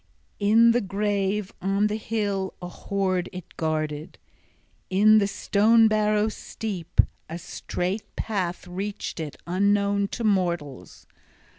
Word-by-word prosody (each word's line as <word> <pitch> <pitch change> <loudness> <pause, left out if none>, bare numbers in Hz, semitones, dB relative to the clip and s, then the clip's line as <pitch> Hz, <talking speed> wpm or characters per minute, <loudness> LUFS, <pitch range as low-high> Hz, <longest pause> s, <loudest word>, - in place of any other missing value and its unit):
In 225 +3 +5
the 240 +1 +2
grave 200 0 -1
on 195 +2 +1
the 210 0 0
hill 205 -3 -2
a 180 - -6
hoard 185 0 -2
it 180 -2 -10
guarded, 155 -1 -2 0.7
in 215 +3 +6
the 200 - +2
stone 220 +3 +4
barrow 215 0 +2
steep. 195 -5 -6 0.3
A 165 - -4
strait 185 +3 -4
path 190 -5 -2
reached 195 +1 -5
it, 155 -3 -5
unknown 200 +2 +2
to 235 - -5
mortals. 175 - -1
200 Hz, 120 wpm, -25 LUFS, 180-210 Hz, 0.7 s, in